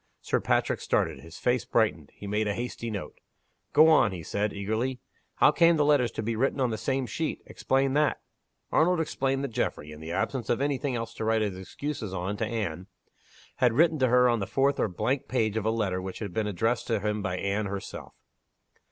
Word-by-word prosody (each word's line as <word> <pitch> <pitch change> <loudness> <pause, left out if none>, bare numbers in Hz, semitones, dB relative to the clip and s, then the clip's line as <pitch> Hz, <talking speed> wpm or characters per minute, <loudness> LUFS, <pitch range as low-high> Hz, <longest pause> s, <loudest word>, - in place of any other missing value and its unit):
Sir - - 0
Patrick - - 0
started. - - 0
His 80 +1 -12
face 125 -3 +1
brightened; 95 -10 0
he - - -10
made 105 +2 0
a 100 - -1
hasty 120 -1 -4
note. 105 -4 -6 0.5
"Go 155 +2 +7
on," 135 -9 +5
he 90 -3 -6
said, 105 +4 -1
eagerly. 110 +6 -2 0.4
"How - - +5
came 170 -1 +4
the 150 - +3
letters 145 -5 +4
to 110 - -3
be 115 +1 -1
written 135 +4 0
on 125 -3 +1
the 110 - -2
same 135 +3 -1
sheet? 160 +5 -3
Explain 135 0 0
that!" 150 +1 +2 0.5
Arnold 175 +2 +3
explained 135 -3 -1
that 140 - -2
Geoffrey, 75 -8 -3
in 75 - -10
the 80 +1 -7
absence 120 +5 -2
of - - +2
any 140 -1 0
thing 140 -4 -2
else 115 0 -4
to - - -5
write 110 0 +2
his 100 -3 -2
excuses 105 +2 -5
on 95 +3 -2
to 110 - -1
Anne, 95 -6 -3 0.7
had 125 -3 +3
written 160 +3 +3
to 130 - +4
her 125 +1 +5
on 120 -2 +2
the 100 - -3
fourth 140 +1 +1
or - - +2
blank 125 +8 -1
page 110 -4 0
of 110 -1 -1
a - - +4
letter 100 -5 -1
which 95 0 -6
had 100 -5 -6
been 110 -1 0
addressed 110 +5 0
to 115 -3 +1
him 105 +1 -1
by 90 -2 -2
Anne 100 +2 -1
herself. 100 0 -7
115 Hz, 220 wpm, -28 LUFS, 100-135 Hz, 0.7 s, Go